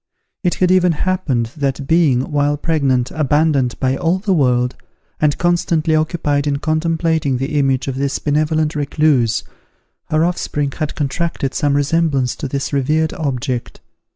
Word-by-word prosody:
It 175 - +1
had 185 -1 +2
even 180 -2 +4
happened, 150 -10 -1
that 140 -2 -2
being, 145 -5 +2
while 145 0 +1
pregnant, 140 -6 0
abandoned 145 -4 +1
by 130 0 +1
all 170 +4 +1
the 195 0 0
world, 125 -5 +2 0.4
and 150 -1 +2
constantly 170 -2 +1
occupied 155 -2 0
in 140 -1 +1
contemplating 160 -2 0
the 140 +3 -1
image 135 -1 +1
of 135 -1 -3
this 140 0 -1
benevolent 155 +1 0
recluse, 145 -5 +1 0.6
her 155 +1 +1
offspring 150 -5 -2
had 155 +1 -4
contracted 145 -1 -2
some 145 -1 +1
resemblance 145 -3 +1
to - - -4
this 140 +2 -3
revered 150 +3 +1
object. 130 -4 -3
150 Hz, 145 wpm, -18 LUFS, 135-160 Hz, 0.6 s, even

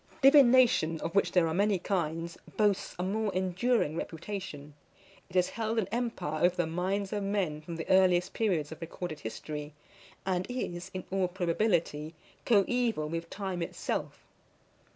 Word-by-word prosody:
DIVINATION, 255 - +6
of 165 - -3
which 200 - +3
there 175 -3 +4
are 160 - -1
many 200 +2 +2
kinds, 170 -3 -2 0.2
boasts 205 -3 +1
a 180 - -2
more 210 +2 0
enduring 185 -1 +1
reputation. 165 -4 -6 0.6
It 180 - -14
has 180 -1 +3
held 225 0 -2
an 215 -5 +1
empire 230 -10 -2
over 175 0 +4
the 175 - +1
minds 190 +5 -2
of 205 - -1
men 195 -7 -1
from 165 +2 -7
the 160 - -5
earliest 185 -1 +4
periods 175 -10 0
of 160 - -9
recorded 165 -1 -5
history, 145 +6 -6 0.5
and 185 -1 0
is, 180 -9 -4
in 185 - -3
all 190 -1 +1
probability, 170 -4 0 0.3
coeval 225 -6 +2
with 165 +1 -4
time 190 -3 -4
itself. 170 - -3
180 Hz, 150 wpm, -30 LUFS, 165-205 Hz, 0.6 s, DIVINATION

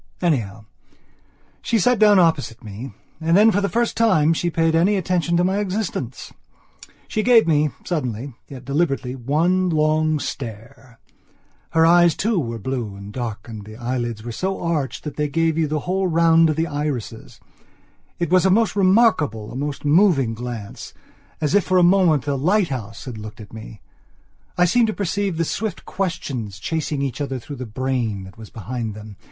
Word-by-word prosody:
Anyhow, 110 - -1 1.0
she 230 - 0
sat 245 +3 +2
down 210 -2 +6
opposite 160 -9 +1
me 110 +5 -8 0.3
and 165 +2 +2
then, 220 +2 +6
for 205 - +1
the 200 - 0
first 235 +5 0
time, 165 -9 +3
she 175 +2 -1
paid 165 -1 +1
any 175 +6 +3
attention 175 -2 0
to 175 - +2
my 190 +2 +1
existence. 190 - -4 0.7
She 215 - -1
gave 235 0 +5
me, 150 -1 +3 0.2
suddenly, 130 -5 -3
yet 130 -2 -10
deliberately, 140 -3 -1
one 165 +9 +1
long 155 -1 +2
stare. 120 -1 -8 0.8
Her 160 0 +5
eyes 170 -1 +5
too 215 -2 0
were 115 -6 -3
blue 115 -3 -4
and 100 +1 -10
dark 115 -4 -5
and 110 -3 -8
the 110 +1 -11
eyelids 120 -2 -3
were 120 - -5
so 190 +11 -3
arched 160 -6 -2
that 150 - -7
they 150 0 0
gave 165 +2 +1
you 160 -1 +1
the 150 0 -2
whole 190 +3 -1
round 165 -1 +4
of 155 - 0
the 160 +1 0
irises. 145 -7 -5 0.8
And 170 - +1
it - - -11
was 185 -1 +5
a 190 - +4
most 210 0 +2
remarkable, 185 - +2
a - - -9
most 145 +2 -4
moving 145 - +3
glance, 115 -3 -7 0.4
as 150 -2 -1
if 205 - +3
for 185 - +2
a 180 - +5
moment 175 -6 +4
a 145 - 0
lighthouse 135 - -1
had 120 -5 -7
looked 105 +1 -9
at 105 -1 -12
me. 110 -2 -10 0.8
I 180 - +5
seemed 230 +6 +3
to 215 - -1
perceive 200 -2 -2
the 165 - +1
swift 210 +2 -4
questions 135 - -4
chasing 150 +5 -2
each 140 +1 -3
other 135 -2 -2
through 140 +3 -8
the 125 -1 -6
brain 115 -4 -2
that 95 0 -12
was 110 - -10
behind 115 0 -5
them. 105 -2 -11
150 Hz, 180 wpm, -21 LUFS, 120-180 Hz, 1.0 s, down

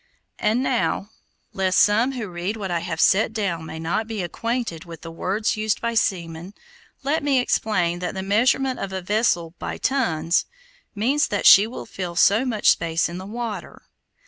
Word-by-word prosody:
And 230 +4 +1
now, 235 -5 -1 0.4
lest 190 -1 +1
some 225 +6 +4
who 235 -5 -4
read 180 +4 -4
what 195 -4 -4
I 170 - 0
have 175 - -5
set 215 +3 +3
down 180 -7 -2
may 160 - -7
not 175 +7 -2
be 220 -4 -3
acquainted 230 -2 -3
with 170 -2 -11
the 165 - -8
words 195 +6 -1
used 215 0 -1
by 235 0 -2
seamen, 175 -4 -2 0.5
let 290 +4 0
me 280 -2 +2
explain 185 -8 +1
that 180 +1 -4
the 190 - -3
measurement 250 +6 +2
of 195 - -4
a 190 0 -3
vessel 180 -5 +1
by - - -4
tons, 175 - 0 0.5
means 265 +9 +1
that 205 - -2
she 205 +2 +9
will 235 - -7
fill 180 -2 -6
so 205 +8 +4
much 225 -5 +3
space 165 0 0
in 175 +1 -6
the 190 - -8
water. 230 0 -6
205 Hz, 180 wpm, -23 LUFS, 175-230 Hz, 0.5 s, she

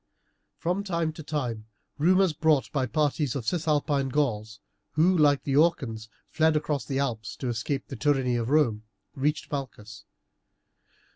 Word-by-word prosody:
From 180 +4 -1
time 170 -5 -1
to 160 - -9
time 125 -8 -4 0.3
rumours, 185 +2 +4
brought 150 -8 +2
by 130 -2 0
parties 145 +1 0
of 130 -5 -4
Cisalpine 150 -2 0
Gauls, 110 -6 -1 0.3
who, 175 +5 +4
like 145 -4 +4
the 135 - -1
Orcans, 125 -9 +1 0.2
fled 160 0 +2
across 150 -2 -1
the 135 - -2
Alps 120 -6 -2
to 130 - -4
escape 120 +4 -2
the - - -8
tyranny 130 -2 +1
of 120 0 -1
Rome, 135 -8 +2 0.3
reached 150 +3 -1
Malchus. 110 -6 -6
140 Hz, 145 wpm, -27 LUFS, 120-155 Hz, 0.3 s, rumours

